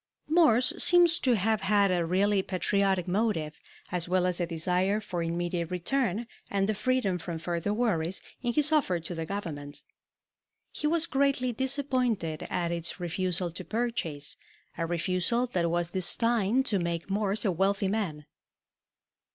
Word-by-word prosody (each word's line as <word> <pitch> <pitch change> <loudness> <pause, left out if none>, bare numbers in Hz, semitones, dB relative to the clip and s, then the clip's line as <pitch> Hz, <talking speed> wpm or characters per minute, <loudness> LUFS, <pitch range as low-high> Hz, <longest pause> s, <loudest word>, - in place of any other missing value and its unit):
Morse 300 -5 +4
seems 345 -1 +6
to 250 -3 +2
have 215 +1 +1
had 200 0 +3
a 175 -2 +1
really 195 +4 +2
patriotic 190 0 0
motive, 180 -6 -1 0.3
as 175 -1 0
well 180 0 +2
as 180 -1 0
a 175 - 0
desire 180 +5 +1
for 185 -5 -4
immediate 170 0 -2
return 220 +4 -1 0.2
and 195 -1 0
the 215 - +1
freedom 215 -5 0
from 170 0 -5
further 170 +3 -2
worries, 190 -6 0 0.2
in 240 -1 0
his 300 +2 +4
offer 270 - +2
to 165 +2 -6
the 165 -1 -5
Government. 150 -8 -6 0.9
He 300 - -2
was 330 +1 +2
greatly 275 -5 +1
disappointed 255 - -1
at 170 -1 -1
its 170 +2 -2
refusal 180 0 -1
to 185 +3 -7
purchase, 175 -11 -2 0.4
a 165 0 -2
refusal 185 +8 0
that 170 -2 +1
was 170 0 -1
destined 230 +6 +2
to 205 -6 +1
make 170 -1 -3
Morse 205 +2 0
a 195 - +3
wealthy 195 +3 +1
man. 190 -8 -2
190 Hz, 150 wpm, -28 LUFS, 170-230 Hz, 0.9 s, seems